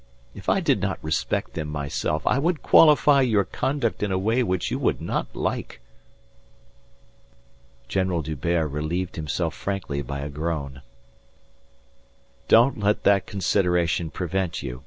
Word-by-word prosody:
If - - -6
I - - +3
did - - +1
not - - -1
respect 80 0 -2
them 80 -2 -4
myself 75 +1 -3
I 135 - +2
would 165 +2 0
qualify 150 -2 +6
your 110 -6 +3
conduct 130 +2 -2
in 105 -2 -1
a 95 - +1
way 110 +6 +1
which 95 -7 -1
you - - -1
would - - 0
not - - -2
like." - - -3 2.1
General 95 0 0
D'Hubert 80 +2 -1
relieved 80 +5 -3
himself 75 -3 -2
frankly 95 -8 -3
by 70 -1 -5
a 70 - -4
groan. 75 -3 -4 1.7
"Don't 120 +2 +5
let 105 +1 +1
that 100 -2 +3
consideration 90 -4 0
prevent 90 +1 -3
you. 60 -2 -6
90 Hz, 135 wpm, -24 LUFS, 75-105 Hz, 2.1 s, qualify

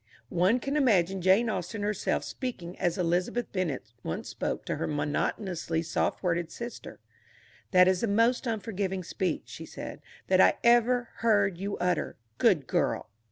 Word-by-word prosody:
One 185 +8 +3
can 275 +4 -2
imagine 195 - +3
Jane 190 +6 +4
Austen 205 +1 -3
herself 210 -1 0
speaking 185 -9 -5
as 175 -2 0
Elizabeth 180 +7 0
Bennet 155 - -3
once 80 - -4
spoke - - -3
to - - -2
her - - -2
monotonously 160 +3 -1
soft 160 - -1
worded 170 -2 0
sister. 235 0 -8 0.7
"That 180 -1 +6
is 185 -1 +2
the 230 - +1
most 230 +5 +2
unforgiving 200 -4 -2
speech," 175 0 -2
she - - -9
said, - - -8 0.2
"that - - +4
I 95 - +6
ever 240 +1 +4
heard 205 -5 +2
you 200 +1 -3
utter. 180 -1 0 0.2
Good - - +4
girl!" - - -1
190 Hz, 155 wpm, -29 LUFS, 175-230 Hz, 0.7 s, That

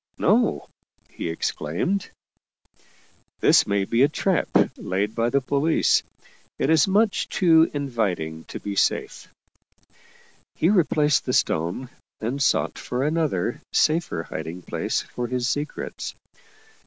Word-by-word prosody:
" - - -48
No," - - +2 0.4
he - - -5
exclaimed, 85 - -2 1.3
"this - - +5
may 100 -1 +1
be 115 +4 +1
a 140 - +7
trap 180 +2 0 0.3
laid 100 +3 -2
by 115 +1 0
the 140 +2 +1
police. 140 +4 +2 0.6
It 145 - +1
is 160 +5 +5
much 205 +2 +1
too 165 -3 +4
inviting 100 - -2
to - - -8
be 100 -1 -5
safe." - - -1 1.2
He 165 - +2
replaced 155 -7 +2
the 125 - -1
stone 90 +11 0 0.3
and 125 +6 -3
sought - - +1
for 125 +1 -3
another, 150 - -1
safer, 155 - +1
hiding 80 +2 -7
place - - -2
for 120 0 -5
his 125 0 -1
secrets. 145 +2 -4
130 Hz, 125 wpm, -24 LUFS, 100-160 Hz, 1.3 s, a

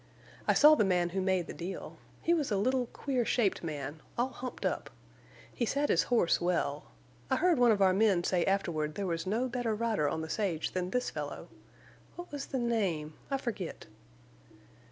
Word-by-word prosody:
I - - +4
saw 300 +1 +8
the 290 - +4
man 180 -3 +2
who 190 +2 -2
made 185 -2 +1
the - - -7
deal. 180 +3 -6 0.3
He 340 - +3
was 310 -5 0
a 205 - +2
little, 250 +4 +1
queer 255 0 -1
shaped 220 -6 +1
man, 150 -1 -5 0.2
all 245 +2 +1
humped 255 -1 -6
up. - - -1 0.6
He - - -2
sat 285 +5 0
his - - +4
horse 230 -9 +3
well. 165 -5 0 0.4
I - - +3
heard 345 -4 +3
one 245 -2 +6
of 200 -2 +3
our 190 -1 +5
men 195 -3 +3
say 175 -1 +1
afterward 165 -6 0
there 200 - -2
was 165 -1 -2
no 230 +6 +1
better 240 -3 -1
rider 215 -9 +1
on 160 - -2
the 160 - -4
sage 170 -3 -1
than 180 -1 -2
this 250 +4 -1
fellow. - - -6 0.7
What 350 0 -9
was 285 -1 -5
the 265 - -2
name? 195 -11 0 0.2
I 275 - +1
forget." 215 -9 -5
200 Hz, 195 wpm, -31 LUFS, 175-245 Hz, 0.7 s, saw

